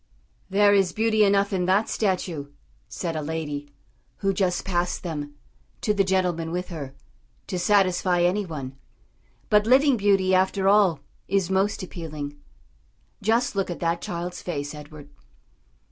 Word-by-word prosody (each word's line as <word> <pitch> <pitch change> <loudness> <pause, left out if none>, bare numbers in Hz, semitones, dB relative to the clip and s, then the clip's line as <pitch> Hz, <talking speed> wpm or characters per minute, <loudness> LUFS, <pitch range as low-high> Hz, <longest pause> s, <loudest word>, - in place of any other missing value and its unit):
"There 205 +1 +4
is 195 -3 +3
beauty 220 -1 +3
enough 200 0 +3
in 180 -2 0
that 195 +4 +2
statue," 180 -8 -1 0.4
said 170 -3 -4
a 155 - -2
lady, 150 -2 -4 0.5
who 195 -1 0
just 185 -2 0
passed 175 -2 -1
them, 145 -4 -5 0.5
to 210 - +1
the 200 -1 +2
gentleman 180 -4 0
with 180 +1 -3
her, 140 -6 -7 0.5
"to 180 - -3
satisfy 185 -2 +2
any 185 +4 +2
one; 140 -7 -6 0.8
but 210 0 +4
living 265 +1 +5
beauty 195 -2 +3
after 190 +1 +2
all 195 -7 +4 0.3
is 195 -1 0
most 195 +1 +1
appealing. 155 -5 -6 0.9
Just 225 +2 +1
look 195 -1 -1
at 175 - -5
that 170 0 0
child's 175 +1 -5
face, 145 -4 -4
Edward." 150 -1 -11
185 Hz, 145 wpm, -25 LUFS, 165-200 Hz, 0.9 s, living